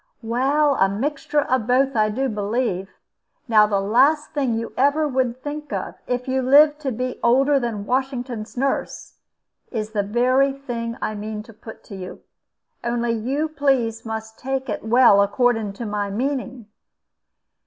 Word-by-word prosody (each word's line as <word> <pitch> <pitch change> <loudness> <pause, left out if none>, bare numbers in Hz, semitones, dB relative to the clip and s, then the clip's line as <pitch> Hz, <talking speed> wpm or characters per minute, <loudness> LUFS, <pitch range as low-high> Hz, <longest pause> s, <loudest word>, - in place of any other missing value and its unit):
"Well, 275 +6 +2
a 195 - +4
mixture 290 +7 -1
of 255 -5 -1
both, 265 +2 +2
I 215 -1 +3
do 265 +6 -1
believe. 210 -3 -2 0.6
Now 215 -2 +5
the 200 -2 +1
last 265 +10 +3
thing 270 -6 0
you 230 0 -4
ever 285 +3 +2
would 260 -2 -1
think 295 0 -6
of, - - -3
if 250 0 -2
you 260 0 0
lived 295 +3 +5
to 280 -3 -3
be 250 +2 -4
older 270 +4 +4
than 225 -5 -3
Washington's 250 -3 -3
nurse, 270 +2 -2 0.5
is 215 -3 -4
the 210 -2 0
very 255 +6 +2
thing 235 -4 -5
I 215 - -1
mean 210 0 -5
to 230 - -15
put 220 +1 -12
to 200 - -10
you. 185 -1 -8 0.6
Only 235 0 0
you 250 +7 -1
must 310 -1 -9
please 245 -6 +1
to 220 -1 -5
take 265 -1 -3
it 210 - -3
well, 225 -3 +5
according 220 0 +1
to 230 +4 -6
my 205 -1 -2
meaning. 255 +1 -3
245 Hz, 165 wpm, -22 LUFS, 220-270 Hz, 0.6 s, Now